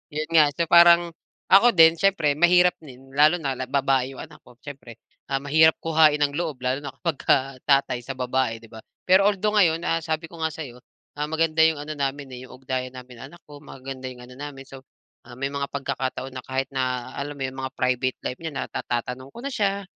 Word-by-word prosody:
Yun 155 Hz, +1 st, -2 dB
nga. 155 Hz, -2 st, +7 dB
So 170 Hz, -1 st, -1 dB
parang, 170 Hz, 0 st, +6 dB, 0.4 s
ako 215 Hz, +6 st, +7 dB
din 165 Hz, -1 st, +7 dB
siyempre 170 Hz, -6 st, +1 dB
mahirap 180 Hz, +2 st, +4 dB
din, 135 Hz, -2 st, -14 dB
lalo 155 Hz, +4 st, +4 dB
na 135 Hz, -4 st, -3 dB
la 130 Hz, -, -4 dB
babae 135 Hz, -1 st, 0 dB
yung -, -, -8 dB
anak 150 Hz, -1 st, -14 dB
ko 125 Hz, -, -19 dB
siyempre. 135 Hz, -6 st, -11 dB, 0.3 s
Ah 135 Hz, -1 st, -1 dB
mahirap 160 Hz, +2 st, +4 dB
kuhain 155 Hz, -2 st, +4 dB
ang 145 Hz, -, +1 dB
loob, 160 Hz, -6 st, -3 dB
lalo 130 Hz, +2 st, 0 dB
na 140 Hz, -, -6 dB
kapagka 135 Hz, -5 st, 0 dB
tatay 140 Hz, -3 st, +2 dB
sa 135 Hz, -, -6 dB
babae, 125 Hz, -2 st, -1 dB
'di 115 Hz, -, -16 dB
ba. 110 Hz, -, -10 dB, 0.3 s
Pero 190 Hz, +2 st, +5 dB
although 210 Hz, +1 st, 0 dB
ngayon 165 Hz, -5 st, +4 dB
ah 165 Hz, -, +1 dB
sabi 160 Hz, 0 st, -3 dB
ko 165 Hz, 0 st, -14 dB
nga 160 Hz, -, 0 dB
sa'yo, 135 Hz, -6 st, -9 dB, 0.4 s
ah 150 Hz, -, -3 dB
maganda 160 Hz, 0 st, +1 dB
yung 160 Hz, -2 st, +2 dB
ano 150 Hz, +1 st, -6 dB
namin 140 Hz, 0 st, -3 dB
eh, 125 Hz, -, -10 dB
yung 130 Hz, -, -14 dB
ugnayan 130 Hz, -1 st, -4 dB
namin 125 Hz, -1 st, -12 dB
ng -, -, -7 dB
anak 175 Hz, -, -16 dB
ko, 145 Hz, -1 st, -12 dB
maganda 130 Hz, -2 st, -8 dB
yung 125 Hz, -1 st, -12 dB
ano 125 Hz, -, -14 dB
namin. 140 Hz, -1 st, -8 dB
So 135 Hz, -1 st, -12 dB, 0.4 s
ah 120 Hz, -, -11 dB
may 135 Hz, -, -1 dB
mga 140 Hz, 0 st, -3 dB
pagkakataon 135 Hz, -1 st, -4 dB
na 130 Hz, -, -7 dB
kahit 130 Hz, 0 st, -3 dB
na, 130 Hz, -1 st, -2 dB
alam 145 Hz, +1 st, -5 dB
mo 135 Hz, -, -3 dB
yun, 130 Hz, -, -9 dB
mga 130 Hz, 0 st, -5 dB
private 125 Hz, 0 st, 0 dB
life 125 Hz, -, -6 dB
niya 160 Hz, -, -4 dB
na -, -, -2 dB
natatanong 125 Hz, +3 st, -4 dB
ko -, -, -12 dB
na 280 Hz, -, -4 dB
siya, 200 Hz, -4 st, -1 dB
140 Hz, 220 wpm, -24 LUFS, 130-160 Hz, 0.4 s, nga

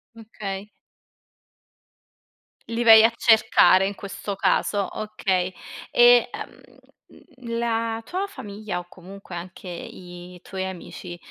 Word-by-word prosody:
Okay. 210 Hz, -3 st, -7 dB, 2.0 s
Li 230 Hz, +1 st, -1 dB
vai 225 Hz, -1 st, +9 dB
a -, -, +5 dB
cercare 220 Hz, -4 st, +5 dB
in 200 Hz, -, -5 dB
questo 200 Hz, 0 st, -6 dB
caso, 200 Hz, +1 st, +1 dB
okay. 190 Hz, -4 st, -1 dB, 0.4 s
E, 240 Hz, 0 st, +6 dB
ehm, -, -, -9 dB, 0.8 s
mhmm, 240 Hz, -2 st, -9 dB
la 230 Hz, -1 st, -1 dB
tua 380 Hz, +3 st, -3 dB
famiglia 205 Hz, -, -6 dB
o 175 Hz, -, -11 dB
comunque 185 Hz, 0 st, -11 dB
anche 180 Hz, +2 st, -8 dB
i 180 Hz, 0 st, -10 dB
tuoi 190 Hz, -1 st, -5 dB
amici 180 Hz, -1 st, -8 dB
200 Hz, 110 wpm, -24 LUFS, 185-225 Hz, 2.0 s, vai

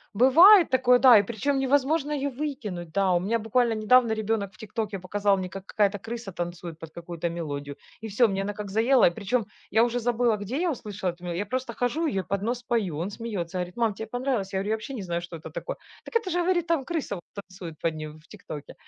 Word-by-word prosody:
бывает 335 Hz, -, +8 dB
такое, 250 Hz, -1 st, +4 dB
да, 250 Hz, -4 st, +8 dB
и 205 Hz, -, +4 dB
причем 240 Hz, +6 st, -1 dB
невозможно 285 Hz, +3 st, +1 dB
её 285 Hz, -1 st, -1 dB
выкинуть, 240 Hz, -, -5 dB
да. 195 Hz, 0 st, +2 dB
У 175 Hz, -, +3 dB
меня 220 Hz, +6 st, 0 dB
буквально 225 Hz, +1 st, +1 dB
недавно 230 Hz, +2 st, +4 dB
ребёнок 220 Hz, -1 st, -1 dB
в -, -, -20 dB
"Тиктоке" 215 Hz, -3 st, -4 dB
показал 200 Hz, +2 st, +1 dB
мне, 185 Hz, -1 st, -4 dB
как 195 Hz, +2 st, -8 dB
какая-то 205 Hz, -1 st, +1 dB
крыса 230 Hz, -4 st, -5 dB
танцует 175 Hz, -2 st, -6 dB
под 165 Hz, -, -9 dB
какую-то 170 Hz, 0 st, -5 dB
мелодию. 145 Hz, -4 st, -5 dB, 0.3 s
И 225 Hz, -, -3 dB
всё, 225 Hz, +4 st, +3 dB
мне 195 Hz, 0 st, -1 dB
она 205 Hz, +1 st, -3 dB
как 205 Hz, -1 st, -6 dB
заела, 235 Hz, +3 st, +5 dB
и -, -, +2 dB
причем 220 Hz, +4 st, -1 dB, 0.3 s
я 220 Hz, +3 st, +5 dB
уже 240 Hz, 0 st, 0 dB
забыла, 235 Hz, -1 st, +1 dB
где 240 Hz, +8 st, -3 dB
я 350 Hz, +1 st, +1 dB
услышала 205 Hz, -6 st, -5 dB
эту 175 Hz, +1 st, -8 dB
мелодию, 175 Hz, -1 st, -3 dB
я 205 Hz, -, -1 dB
просто 255 Hz, +1 st, -3 dB
хожу 295 Hz, +8 st, 0 dB
ее 275 Hz, -, -2 dB
и -, -, -2 dB
под 200 Hz, 0 st, -1 dB
нос 245 Hz, +2 st, -2 dB
пою. 210 Hz, -11 st, -1 dB
Он 175 Hz, +5 st, -2 dB
смеется, 195 Hz, -6 st, -4 dB
говорит: 180 Hz, +2 st, -4 dB
"Мам, 230 Hz, -3 st, +1 dB
тебе 220 Hz, +2 st, -7 dB
понравилось?" 245 Hz, -6 st, -2 dB
Я 190 Hz, -, 0 dB
говорю: 200 Hz, +2 st, -3 dB
"Я 220 Hz, -, +2 dB
вообще 220 Hz, +5 st, -7 dB
не 210 Hz, -, -5 dB
знаю, 170 Hz, -1 st, -2 dB
что 175 Hz, -1 st, -8 dB
это -, -, -10 dB
такое". -, -, -5 dB, 0.3 s
"Так -, -, -11 dB
это -, -, -5 dB
же"- 355 Hz, 0 st, 0 dB
говорит.- 350 Hz, -1 st, +1 dB
"Там 330 Hz, -5 st, +1 dB
крыса 320 Hz, -11 st, -3 dB
вот 175 Hz, -, -9 dB
танцует 185 Hz, -5 st, -9 dB
под 165 Hz, -1 st, 0 dB
нее 155 Hz, 0 st, -6 dB
в 155 Hz, +1 st, -16 dB
"Тиктоке"". 145 Hz, -1 st, -9 dB
215 Hz, 240 wpm, -26 LUFS, 185-250 Hz, 0.3 s, бывает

